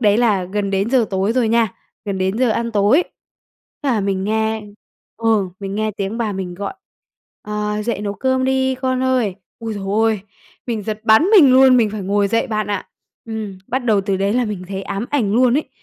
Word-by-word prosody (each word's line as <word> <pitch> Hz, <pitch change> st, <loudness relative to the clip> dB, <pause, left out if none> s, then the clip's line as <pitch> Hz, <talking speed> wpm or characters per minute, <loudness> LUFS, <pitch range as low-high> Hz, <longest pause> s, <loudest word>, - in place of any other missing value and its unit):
đấy 210 Hz, -1 st, +3 dB
là 210 Hz, -6 st, +2 dB
gần 200 Hz, +2 st, -2 dB
đến 195 Hz, +4 st, 0 dB
giờ 255 Hz, -3 st, +4 dB
tối 195 Hz, +2 st, 0 dB
rồi 240 Hz, -2 st, +1 dB
nha, 225 Hz, -3 st, +2 dB, 0.3 s
gần 200 Hz, -2 st, -3 dB
đến 190 Hz, +3 st, -1 dB
giờ 255 Hz, -2 st, +3 dB
ăn 235 Hz, +1 st, -1 dB
tối, 215 Hz, -, +4 dB, 0.8 s
thế 280 Hz, -, +1 dB
là 225 Hz, -, +1 dB
mình 195 Hz, -1 st, -1 dB
nghe 220 Hz, 0 st, 0 dB, 0.5 s
ừ, 220 Hz, -4 st, +1 dB
mình 195 Hz, 0 st, -4 dB
nghe 215 Hz, 0 st, 0 dB
tiếng 200 Hz, +4 st, -3 dB
bà 220 Hz, -3 st, -1 dB
mình 190 Hz, -2 st, -5 dB
gọi: 200 Hz, +2 st, -5 dB, 0.7 s
"Ờ, 210 Hz, 0 st, -2 dB
dậy 230 Hz, -2 st, -2 dB
nấu 205 Hz, -1 st, -3 dB
cơm 260 Hz, +5 st, 0 dB
đi 265 Hz, 0 st, +1 dB
con 255 Hz, 0 st, -1 dB
ơi". 250 Hz, -7 st, +1 dB, 0.2 s
Ôi 225 Hz, -1 st, -5 dB
giời 200 Hz, -1 st, -6 dB, 0.2 s
ơi, 220 Hz, -3 st, +1 dB, 0.5 s
mình 230 Hz, -4 st, -2 dB
giật 215 Hz, +1 st, -4 dB
bắn 220 Hz, +7 st, +6 dB
mình 280 Hz, -9 st, +7 dB
luôn, 260 Hz, 0 st, +7 dB
mình 225 Hz, -4 st, +3 dB
phải 210 Hz, -2 st, -5 dB
ngồi 200 Hz, +1 st, +1 dB
dậy 230 Hz, +4 st, +1 dB
bạn 215 Hz, -3 st, -2 dB
ạ. 205 Hz, -2 st, -3 dB, 0.4 s
Ừm, 220 Hz, -4 st, -6 dB
bắt 255 Hz, -, 0 dB
đầu 215 Hz, -4 st, +3 dB
từ 195 Hz, 0 st, -1 dB
đấy 195 Hz, +1 st, 0 dB
là 250 Hz, +1 st, +1 dB
mình 205 Hz, -5 st, -5 dB
thấy 195 Hz, 0 st, -4 dB
ám 200 Hz, +4 st, -4 dB
ảnh 235 Hz, -9 st, +1 dB
luôn 250 Hz, 0 st, +4 dB
ấy, 310 Hz, -, -5 dB
215 Hz, 215 wpm, -19 LUFS, 200-240 Hz, 0.8 s, mình